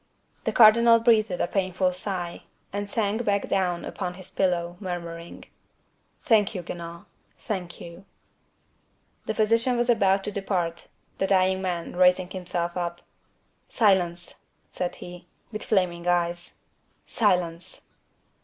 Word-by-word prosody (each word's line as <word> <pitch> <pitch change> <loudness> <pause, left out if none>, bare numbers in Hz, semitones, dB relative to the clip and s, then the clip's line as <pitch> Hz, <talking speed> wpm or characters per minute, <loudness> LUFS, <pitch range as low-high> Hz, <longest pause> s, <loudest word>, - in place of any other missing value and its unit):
The - - +1
cardinal 230 +1 +7
breathed 225 -2 +4
a 180 - -1
painful 185 -1 0
sigh, 180 -2 -5 0.3
and 205 0 -3
sank 220 +1 0
back 200 -2 0
down 180 -3 0
upon 180 0 -4
his 185 0 -9
pillow, 175 -2 0
murmuring, 170 -3 -6 0.8
"Thank 220 -7 +3
you, 180 - -4
Guenaud, 170 0 -8 0.3
thank 180 -5 -5
you!" 170 +3 -11 1.2
The 220 - -1
physician 230 +3 +2
was 240 0 +3
about 195 -3 +3
to 210 - -3
depart; 180 -4 -2 0.3
the 195 - +1
dying 190 0 +3
man, 175 -3 -3
raising 180 0 +4
himself 175 -2 -3
up: 175 -1 -3 0.7
"Silence!" 180 -6 +1 0.3
said 180 -1 -3
he, 175 0 -11 0.2
with 215 -1 -5
flaming 180 -4 0
eyes, 175 0 -1 0.4
"silence!" 180 -5 0
185 Hz, 125 wpm, -26 LUFS, 175-205 Hz, 1.2 s, cardinal